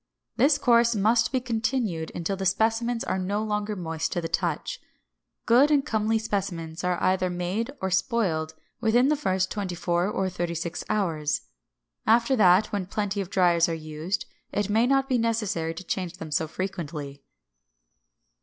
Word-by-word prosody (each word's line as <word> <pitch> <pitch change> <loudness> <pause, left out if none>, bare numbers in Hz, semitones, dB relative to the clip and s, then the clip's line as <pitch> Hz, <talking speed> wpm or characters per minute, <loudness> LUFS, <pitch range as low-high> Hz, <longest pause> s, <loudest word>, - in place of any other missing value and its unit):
This 285 +1 +4
course 235 -3 +4
must 220 +3 +3
be 260 - +1
continued 225 -8 -1
until 175 +3 -2
the 190 0 -1
specimens 225 +4 +1
are 190 - -1
no 200 +3 -1
longer 210 0 -2
moist 165 -3 -3
to - - -1
the 165 - -3
touch. - - -2 0.6
Good 250 +5 +5
and 290 -2 +3
comely 220 0 +1
specimens 180 -6 -3
are 180 -1 +1
either 185 0 +2
made 180 +6 -2
or 190 0 -2
spoiled 180 -7 0 0.2
within 240 +4 +3
the 300 - +3
first 190 -10 0
twenty 195 -4 -3
four 175 +1 0
or 195 -2 -1
thirty 175 -2 -3
six 170 +1 -4
hours. 160 -8 0 0.7
After 235 +4 +4
that, 190 -2 +5
when 200 -3 -2
plenty 205 0 -2
of 185 - -6
driers 175 -3 +3
are 165 - -1
used, 155 +4 -4 0.3
it 205 0 -1
may 225 +3 +3
not 270 0 +2
be 255 -2 +1
necessary 210 -8 -1
to 185 - -7
change 180 -1 -3
them 160 -3 -8
so 160 +2 +1
frequently. 155 -6 -5
195 Hz, 165 wpm, -26 LUFS, 175-225 Hz, 0.7 s, Good